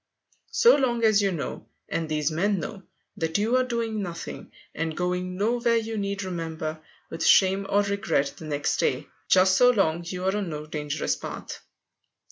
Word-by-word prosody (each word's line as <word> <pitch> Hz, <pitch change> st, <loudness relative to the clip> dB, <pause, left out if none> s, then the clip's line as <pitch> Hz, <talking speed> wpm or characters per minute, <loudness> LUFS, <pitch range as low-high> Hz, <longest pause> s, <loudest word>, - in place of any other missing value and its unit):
So 475 Hz, +1 st, +5 dB
long 240 Hz, -4 st, 0 dB
as 215 Hz, -2 st, +5 dB
you 200 Hz, -1 st, +1 dB
know, 160 Hz, -6 st, -5 dB, 0.2 s
and 165 Hz, -1 st, -3 dB
these 150 Hz, 0 st, 0 dB
men 195 Hz, +5 st, +1 dB
know, 195 Hz, +5 st, -6 dB, 0.4 s
that 160 Hz, +2 st, 0 dB
you 220 Hz, +4 st, +1 dB
are 255 Hz, -, +3 dB
doing 230 Hz, -3 st, -2 dB
nothing 170 Hz, -4 st, -7 dB, 0.2 s
and 160 Hz, 0 st, -3 dB
going 180 Hz, +1 st, -2 dB
nowhere 235 Hz, +3 st, +2 dB
you 225 Hz, 0 st, -1 dB
need 200 Hz, -1 st, -2 dB
remember 160 Hz, -3 st, -4 dB, 0.3 s
with 165 Hz, 0 st, -4 dB
shame 195 Hz, +1 st, +4 dB
or 205 Hz, +1 st, +3 dB
regret, 200 Hz, -8 st, 0 dB
the 160 Hz, -, -9 dB
next 145 Hz, -1 st, -1 dB
day, -, -, 0 dB, 0.2 s
just 185 Hz, 0 st, +5 dB
so 245 Hz, +5 st, +6 dB
long 175 Hz, -8 st, +2 dB
you 180 Hz, +1 st, -5 dB
are 190 Hz, +1 st, +1 dB
on 205 Hz, -4 st, -2 dB
no 150 Hz, -1 st, -5 dB
dangerous 150 Hz, -1 st, -2 dB
path. -, -, -7 dB
190 Hz, 175 wpm, -26 LUFS, 160-215 Hz, 0.4 s, so